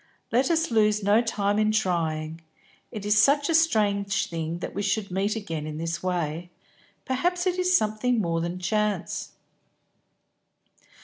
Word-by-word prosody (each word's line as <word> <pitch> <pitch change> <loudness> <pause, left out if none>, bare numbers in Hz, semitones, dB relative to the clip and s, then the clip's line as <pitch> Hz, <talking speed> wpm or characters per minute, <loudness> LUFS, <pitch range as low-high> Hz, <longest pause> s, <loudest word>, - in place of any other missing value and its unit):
Let 250 +3 +2
us 325 -4 +1
lose 210 -2 +2
no 205 +3 +4
time 205 -3 0
in 215 0 +2
trying. 165 -6 -1 0.5
It 210 -4 -6
is 210 0 +3
such 285 +3 +3
a - - +2
strange 205 - +1
thing 165 0 -3
that 175 - -6
we 200 - -3
should 205 -1 -1
meet 195 +4 0
again 165 -8 -4
in 155 0 -5
this 165 +1 -3
way; 175 -2 -2 0.6
perhaps 355 +8 0
it 365 0 0
is 365 0 +4
something 215 +3 0
more 165 -4 0
than 170 +2 -3
chance." 205 +1 -2
205 Hz, 150 wpm, -26 LUFS, 175-230 Hz, 0.6 s, no